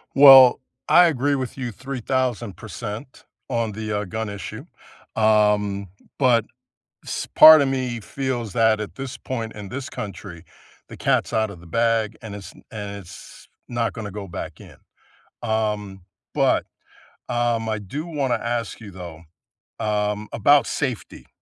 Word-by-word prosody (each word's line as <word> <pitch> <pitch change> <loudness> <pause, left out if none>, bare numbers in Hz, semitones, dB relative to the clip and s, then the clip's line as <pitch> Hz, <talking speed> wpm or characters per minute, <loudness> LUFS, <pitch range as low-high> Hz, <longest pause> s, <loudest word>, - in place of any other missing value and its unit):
Well, 135 -2 +9 0.3
I 175 0 +7
agree 145 -2 +1
with 130 -1 -4
you 125 -3 -4
3,000% 120 - -4 0.2
on 115 -3 -1
the, 110 0 -5
uh, 105 - -4
gun 110 +3 -4
issue, 100 -4 -7 0.5
um, 105 -2 +2 0.3
but 120 -5 +3 0.6
s - - -4
part 155 -1 +11
of 140 - +2
me 130 -3 -2
feels 120 0 -4
that 110 -1 +3
at 105 - -6
this 135 -1 -6
point 115 -4 -5
in 105 -2 -8
this 130 +5 -6
country, 95 -4 -8 0.4
the - - -10
cat's - - 0
outta 110 -3 0
the 85 +1 -15
bag, 115 +3 0
and 105 -3 -7
it's 100 -2 -9 0.2
and 105 -2 -6
it's 90 -3 -13 0.2
not 120 -1 -1
gonna 105 -3 -6
go 100 0 -7
back 85 - -7
in, - - -14 0.7
um, 105 -4 -2 0.3
but, - - +2 0.7
um, 120 -2 0
I 110 - -1
do 140 - -6
wanna 140 -7 -1
ask 120 -1 -3
you, 110 -3 -10
though, 85 -3 -9 0.6
um, 105 0 -1
about 145 0 +4
safety 130 -6 -4
110 Hz, 145 wpm, -23 LUFS, 105-130 Hz, 0.7 s, part